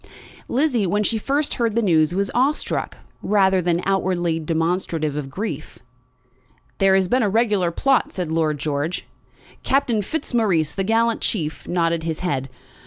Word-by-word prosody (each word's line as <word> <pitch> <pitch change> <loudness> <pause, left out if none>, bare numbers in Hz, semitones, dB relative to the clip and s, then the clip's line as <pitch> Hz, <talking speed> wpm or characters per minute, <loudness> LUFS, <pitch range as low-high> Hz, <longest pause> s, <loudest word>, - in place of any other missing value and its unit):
Lizzie, 250 -6 +1
when 205 +4 +1
she 220 +1 0
first 280 +6 0
heard 230 -3 -1
the 235 - +3
news, 160 -5 +3
was 195 +2 -1
awe 265 +4 +3
struck, - - -4 0.2
rather 190 -2 +3
than 175 0 0
outwardly 180 -4 0
demonstrative 165 -1 -1
of 145 -2 -4
grief. 155 -2 -5 1.0
"There 195 -1 +5
has 190 -1 +2
been 255 +6 +2
a 210 - +2
regular 210 -4 +2
plot," 265 +10 +1
said 180 -4 -4
Lord 160 -2 +1
George. 150 +3 -2 0.6
Captain 260 -5 +1
Fitzmaurice, 205 - 0
the 195 - -2
gallant 225 +3 +1
chief, 160 -7 -2
nodded 170 -1 0
his 160 0 -4
head. 135 -7 -2
190 Hz, 155 wpm, -22 LUFS, 165-225 Hz, 1.0 s, There